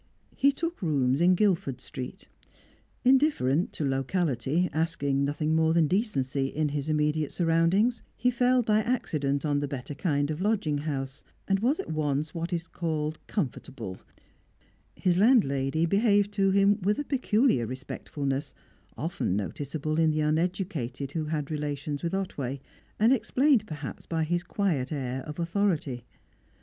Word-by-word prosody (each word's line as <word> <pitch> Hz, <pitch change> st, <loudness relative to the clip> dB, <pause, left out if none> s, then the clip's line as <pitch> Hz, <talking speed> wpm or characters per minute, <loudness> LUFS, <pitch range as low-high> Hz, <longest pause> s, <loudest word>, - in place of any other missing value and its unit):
He 280 Hz, +1 st, +4 dB
took 335 Hz, +4 st, -4 dB
rooms 140 Hz, -4 st, +1 dB
in 180 Hz, +1 st, +5 dB
Guildford 170 Hz, -10 st, +1 dB
Street. 130 Hz, +9 st, -8 dB, 0.8 s
Indifferent 255 Hz, -, +3 dB
to 150 Hz, -, -2 dB
locality, 135 Hz, +2 st, 0 dB
asking 150 Hz, -4 st, 0 dB
nothing 150 Hz, +2 st, -1 dB
more 160 Hz, 0 st, +3 dB
than 165 Hz, -2 st, +5 dB
decency 145 Hz, -, 0 dB
in 150 Hz, +2 st, -1 dB
his 145 Hz, +1 st, -3 dB
immediate 150 Hz, 0 st, +1 dB
surroundings, 175 Hz, +8 st, +2 dB, 0.2 s
he 250 Hz, +3 st, +2 dB
fell 250 Hz, 0 st, +3 dB
by 215 Hz, -1 st, +3 dB
accident 155 Hz, -, -1 dB
on 145 Hz, -1 st, +1 dB
the 145 Hz, -, -2 dB
better 135 Hz, +1 st, -5 dB
kind 145 Hz, -1 st, 0 dB
of 155 Hz, +3 st, -4 dB
lodging 195 Hz, -8 st, +1 dB
house, 135 Hz, -2 st, -4 dB, 0.2 s
and 195 Hz, 0 st, +2 dB
was 255 Hz, +9 st, +1 dB
at -, -, -4 dB
once 150 Hz, -1 st, -1 dB
what 170 Hz, +1 st, -3 dB
is 170 Hz, -1 st, -2 dB
called 155 Hz, -2 st, -3 dB
comfortable; 125 Hz, -, -4 dB, 1.0 s
his 180 Hz, -1 st, +1 dB
landlady 160 Hz, -, +3 dB
behaved 205 Hz, +2 st, +3 dB
to 195 Hz, -1 st, +2 dB
him 200 Hz, +2 st, +4 dB
with 205 Hz, +5 st, +1 dB
a 290 Hz, -, -1 dB
peculiar 245 Hz, -, +2 dB
respectfulness, 135 Hz, +2 st, -4 dB, 0.4 s
often 90 Hz, -, -1 dB
noticeable 145 Hz, -, -2 dB
in 160 Hz, -1 st, +4 dB
the 155 Hz, 0 st, +1 dB
uneducated 155 Hz, -4 st, -1 dB
who 155 Hz, 0 st, -2 dB
had 150 Hz, -1 st, -3 dB
relations 145 Hz, -1 st, -3 dB
with 170 Hz, +2 st, -1 dB
Otway, 140 Hz, -9 st, -3 dB, 0.4 s
and 225 Hz, +4 st, +5 dB
explained 260 Hz, -2 st, +2 dB
perhaps 150 Hz, -3 st, -7 dB
by 165 Hz, -1 st, 0 dB
his 175 Hz, +2 st, 0 dB
quiet 175 Hz, -8 st, -1 dB
air 130 Hz, -3 st, -3 dB
of 150 Hz, -, -7 dB
authority. 170 Hz, -, -1 dB
155 Hz, 145 wpm, -28 LUFS, 140-195 Hz, 1.0 s, in